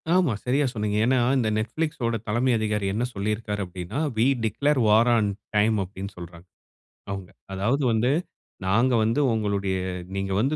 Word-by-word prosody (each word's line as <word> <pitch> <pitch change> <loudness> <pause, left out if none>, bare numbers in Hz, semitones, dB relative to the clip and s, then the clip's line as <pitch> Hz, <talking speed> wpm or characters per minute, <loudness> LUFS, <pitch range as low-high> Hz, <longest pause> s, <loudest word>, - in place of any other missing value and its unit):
ஆமா 175 -11 +3
சரியா 135 +3 +2
சொன்னீங்க. 105 -1 -1
ஏன்னா 130 0 +3 0.2
இந்த 115 -4 +1
நெட்ஃபிளிக்ஸ்ஸோட 115 0 -1
தலைமை 120 +4 +1
அதிகாரி 105 -2 -1
என்ன 115 +3 0
சொல்லியிருக்காரு 105 +1 -2
அப்டின்னா, 90 - -5 0.2
"வீ 115 - +4 0.2
டிக்ளேர் 140 +6 +1
வார் 110 +3 +5
ஆன் 105 -3 +2 0.3
டைம்" 105 +1 +3
அப்டின்னு 95 +1 -8
சொல்றாங்க, 85 0 -10 0.6
அவுங்க. 95 -2 -5 0.2
அதாவது 115 +9 0
வந்து 115 +4 +2 0.6
நாங்க 120 +6 +3
வந்து 115 +6 +1
உங்களுடைய 100 -3 -1 0.4
நீங்க 95 0 -2
வந்து 135 +6 +1
110 Hz, 150 wpm, -25 LUFS, 100-125 Hz, 0.6 s, வார்